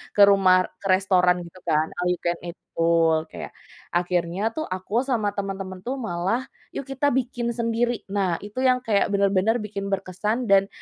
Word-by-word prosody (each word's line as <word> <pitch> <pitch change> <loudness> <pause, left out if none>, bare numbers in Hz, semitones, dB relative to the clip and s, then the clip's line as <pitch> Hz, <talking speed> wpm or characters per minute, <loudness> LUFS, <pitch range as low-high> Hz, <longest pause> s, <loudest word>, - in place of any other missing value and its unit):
ke 205 - +4
rumah 195 -2 +5 0.3
ke 200 - -4
restoran 185 -1 +4
gitu 175 +2 -14
kan 155 0 +2
All 180 - 0
You 180 - -2
Can 170 0 0
Eat 170 - -6 0.2
betul 165 -1 +3
kayak - - -7 0.4
akhirnya 175 +1 0
tuh 315 - -2
aku 195 +7 -2
sama 225 -6 0
temen-temen 195 -1 -4
tuh 260 +2 -2
malah 210 +4 -1 0.3
yuk 275 - -5
kita 270 +1 0
bikin 240 -2 -1
sendiri 235 0 -1
nah 195 -4 0
itu 210 +5 -6
yang 255 -1 +4
kayak 205 -3 +2
bener-bener 200 +2 +2
bikin 200 -1 -5
berkesan 210 +6 -2
dan, 195 0 +5
195 Hz, 170 wpm, -24 LUFS, 180-230 Hz, 0.4 s, rumah